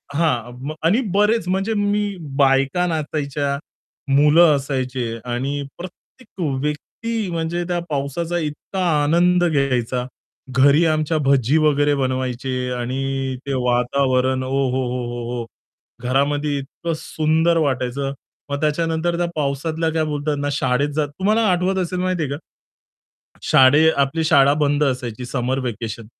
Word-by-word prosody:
हां. 130 -2 -1
आणि 190 +10 +3
बरेच 210 -1 +2
म्हणजे 195 +4 0
मी, 205 -1 0 0.2
बायका 135 +5 +3
नाचायच्या, 145 -3 -2 0.6
मुलं 150 +3 +6
असायचे 130 -3 -2
आणि 130 +4 -2 0.2
प्रत्येक 185 +4 -12 0.2
व्यक्ती 205 +9 -3
म्हणजे 165 +1 -2
त्या 175 -1 -1
पावसाचा 150 +4 -2
इतका 160 +5 -4 0.2
आनंद 175 +3 +3
घ्यायचा. 130 -5 0 0.5
घरी 145 +5 +5
आमच्या 155 0 +1
भज्जी 135 +1 +3
वगैरे 145 -2 +3
बनवायचे 130 -1 -2 0.2
आणि 135 +2 -2
ते 140 - -2
वातावरण 130 +1 +1
ओहोहोहोहो! 125 -2 -2 0.6
घरामध्ये 145 +3 +1
इतकं 145 +4 -5
सुंदर 160 +2 +1
वाटायचं. 135 -2 -1 0.4
मग 140 0 -3
त्याच्यानंतर 165 +2 0
त्या 175 - +1
पावसातल्या 155 +3 -1
काय 160 -1 +1
बोलतात 150 0 -2
ना 145 0 -1
शाळेत 135 +1 +1
जात 150 -1 +1
तुम्हाला 215 +4 +2
आठवत 180 +2 +1
असेल 180 +1 -3
माहितीये 180 -5 -1
का? 140 - -3 1.1
शाळे 145 +5 +5
आपली 140 +4 +1
शाळा 140 -3 +5
बंद 145 +1 +2
असायची 125 -3 -3
समर 130 +1 -1
व्हॅकेशन 115 -3 -5
145 Hz, 120 wpm, -21 LUFS, 130-165 Hz, 1.1 s, मुलं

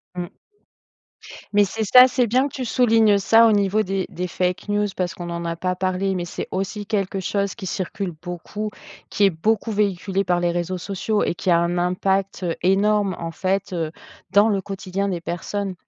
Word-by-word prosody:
Mmh. 175 -1 -4 1.2
Mais 205 0 +5
c'est 220 +3 -3
ça, 250 +5 +8
c'est 250 -1 +1
bien 255 +5 +2
que - - -13
tu 260 - -4
soulignes 225 -4 +4
ça, 225 +3 +5
au - - +4
niveau 205 +1 +2
des 195 -1 -2
des 180 +1 -4
fake 180 +3 -2
news, 205 0 +1
parce 180 -1 -2
qu'on 175 -1 -6
en 170 0 -4
a 170 0 -2
pas 180 +2 -2
parlé, 185 +1 -1
mais 180 -2 -2
c'est 175 - -6
aussi 195 +2 -3
quelque 195 -2 -1
chose 200 +1 -1
qui 205 - -8
circule 185 0 -3
beaucoup, 175 +4 -5 0.4
qui 205 - 0
est 195 - +7
beaucoup 220 +7 0
véhiculé 200 -1 0
par 175 -1 +1
les 175 0 +1
réseaux 175 +1 -2
sociaux 200 +3 -1
et - - 0
qui 180 - -3
a 170 - +5
un 170 +1 0
impact 190 +1 0 0.2
énorme, 200 +1 +2
en 165 0 -5
fait, 190 +2 -2
heu, 165 -3 -2 0.4
dans 205 +3 +5
le 195 -2 0
quotidien 195 0 -3
des 175 -3 -3
personnes. 190 +3 -3
195 Hz, 195 wpm, -22 LUFS, 180-205 Hz, 1.2 s, ça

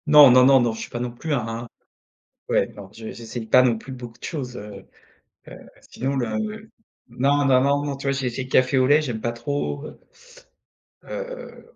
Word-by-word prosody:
Non, 150 -3 +9
non, 125 0 +7
non, 135 0 +7
non, 120 -2 +1
je 110 - -8
suis - - -7
pas 120 - -5
non 120 0 -3
plus 150 +6 -4
un 115 -2 -3 0.8
ouais, - - +2
non, 100 -2 -10
j'e 110 0 -8
j'essaye 115 0 -7
pas 125 +3 +6
non 120 -3 +2
plus 125 +4 -10
beaucoup 120 -2 -9
de - - -21
choses, 130 -6 -5
heu 100 -2 -10 0.8
heu, - - -17 0.2
sinon 135 +2 -2
là, 120 -4 -1
le 220 0 -6 0.4
non, 140 +4 +1
non, 130 -2 +5
non, 140 +1 +2
non, 140 -1 -3
tu 140 - -9
vois? - - +3
J'ai 135 -2 -2
essayé 125 +2 -3
le 130 - -11
café 130 +1 +3
au 130 - +4
lait, 150 +3 +5
j'aime 120 -7 -4
pas 120 - -1
trop, 140 +4 -3
heu - - -13 1.0
heu, - - -21 0.2
voilà, - - -10
130 Hz, 220 wpm, -23 LUFS, 120-140 Hz, 1.0 s, Non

